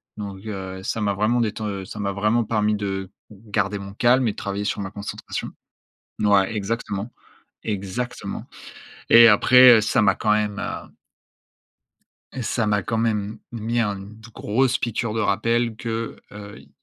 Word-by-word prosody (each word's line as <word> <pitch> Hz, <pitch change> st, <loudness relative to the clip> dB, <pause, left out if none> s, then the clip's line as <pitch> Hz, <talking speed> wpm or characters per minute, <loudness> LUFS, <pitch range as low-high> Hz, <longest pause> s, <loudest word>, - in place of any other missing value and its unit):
donc 100 Hz, -1 st, -7 dB
heu, 95 Hz, -2 st, -6 dB
ça 110 Hz, -, -2 dB
m'a 100 Hz, -1 st, +1 dB
vraiment 110 Hz, +4 st, +1 dB
déten 105 Hz, -3 st, -3 dB
ça 105 Hz, -, -9 dB
m'a 100 Hz, -1 st, -1 dB
vraiment 105 Hz, +4 st, +1 dB
permis 105 Hz, -1 st, +1 dB
de 95 Hz, -2 st, -3 dB, 0.2 s
garder 105 Hz, -1 st, -2 dB
mon 100 Hz, 0 st, -8 dB
calme 125 Hz, +2 st, +3 dB
et -, -, +1 dB
de -, -, -13 dB
travailler 100 Hz, +1 st, -3 dB
sur 105 Hz, -, -2 dB
ma 95 Hz, 0 st, -5 dB
concentration. 100 Hz, 0 st, -6 dB, 0.7 s
Ouais, 100 Hz, 0 st, +3 dB
exactement. 105 Hz, +1 st, -3 dB, 0.5 s
Exactement 105 Hz, +4 st, -4 dB, 0.6 s
et 115 Hz, 0 st, +9 dB
après, 125 Hz, +3 st, +7 dB
heu, -, -, +2 dB
ça 105 Hz, -, +2 dB
m'a 100 Hz, -2 st, +4 dB
quand 105 Hz, -, 0 dB
même, 105 Hz, -1 st, 0 dB
heu -, -, -6 dB, 1.5 s
ça 115 Hz, -1 st, -1 dB
m'a 105 Hz, -2 st, +1 dB
quand 115 Hz, -, -2 dB
même 110 Hz, -1 st, -1 dB
mis 115 Hz, +1 st, -2 dB
un 105 Hz, -3 st, 0 dB
d 105 Hz, +3 st, -12 dB
grosse 125 Hz, +4 st, +1 dB
piqûre 115 Hz, -1 st, -2 dB
de 110 Hz, -, -1 dB
rappel 115 Hz, +3 st, +1 dB
que, 115 Hz, -1 st, -4 dB, 0.2 s
heu, 105 Hz, 0 st, -10 dB
il -, -, -19 dB
105 Hz, 160 wpm, -23 LUFS, 100-115 Hz, 1.5 s, et